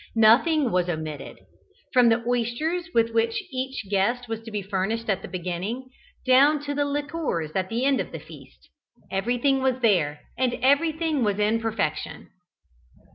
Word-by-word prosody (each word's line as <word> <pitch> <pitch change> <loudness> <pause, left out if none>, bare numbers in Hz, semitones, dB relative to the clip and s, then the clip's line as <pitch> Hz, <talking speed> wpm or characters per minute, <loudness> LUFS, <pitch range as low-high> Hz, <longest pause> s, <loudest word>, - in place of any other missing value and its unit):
Nothing 245 +5 +4
was 180 -1 +1
omitted. 155 -4 -5 0.5
From 250 -2 +6
the 230 +1 +2
oysters 245 +9 -1
with 230 -4 +2
which 225 0 +1
each 265 -3 -4
guest 210 +6 0
was 225 0 -4
to 225 - -10
be 210 -2 -4
furnished 205 +4 -2
at 195 - -1
the - - -7
beginning, 185 +8 -4 0.4
down 275 +4 +5
to 290 0 -3
the 290 0 0
liqueurs 290 - -2
at 190 -1 -1
the 235 +3 -1
end 275 -1 +3
of - - -7
the - - -6
feast, - - -15 0.4
everything 245 +7 +1
was 260 -1 +1
there, 155 -9 +2 0.2
and 255 -2 +1
everything 310 +1 +2
was 205 -2 +1
in 210 +2 +2
perfection. 205 -9 -3
230 Hz, 160 wpm, -25 LUFS, 195-270 Hz, 0.5 s, From